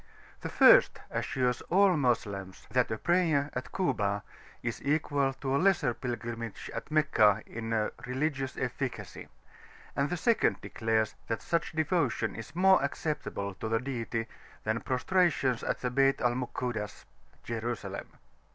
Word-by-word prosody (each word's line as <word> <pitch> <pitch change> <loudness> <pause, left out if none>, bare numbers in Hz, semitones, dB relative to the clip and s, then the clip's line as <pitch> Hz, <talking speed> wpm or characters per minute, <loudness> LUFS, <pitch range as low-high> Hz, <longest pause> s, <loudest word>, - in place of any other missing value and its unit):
The - - -5
first - - +6
assures 125 -3 0
all 195 0 +5
Moslems 105 -8 -1
that 125 +1 +2
a 110 - -2
prayer 160 -4 +2
at 125 - -5
Kuba 105 - 0 0.4
is 115 -1 -3
equal 145 -2 +1
to 135 0 -2
a 140 - +2
Lesser 175 -10 +3
Pilgrimage 120 -2 -5
at - - -6
Meccah 110 -9 +4
in 115 -1 -2 0.2
religious 135 0 -2
efficacy; 130 0 -4 0.7
and 140 +1 +1
the 180 - -1
second 230 +6 +2
declares 110 -1 0
that 115 - -2
such 170 -2 -1
devotion 160 -4 0
is 115 +7 -9
more 190 +1 +5
acceptable 140 -9 -3
to 110 +4 -5
the 115 0 +2
Deity 115 -3 -3 0.4
than 110 +1 -1
prostrations 130 -2 +1
at - - -2
the 125 - -1
Bayt 135 +1 +3
al 120 0 +2
Mukuddas 120 -4 -4 0.4
(Jerusalem). 115 +1 -4
125 Hz, 135 wpm, -30 LUFS, 115-150 Hz, 0.7 s, first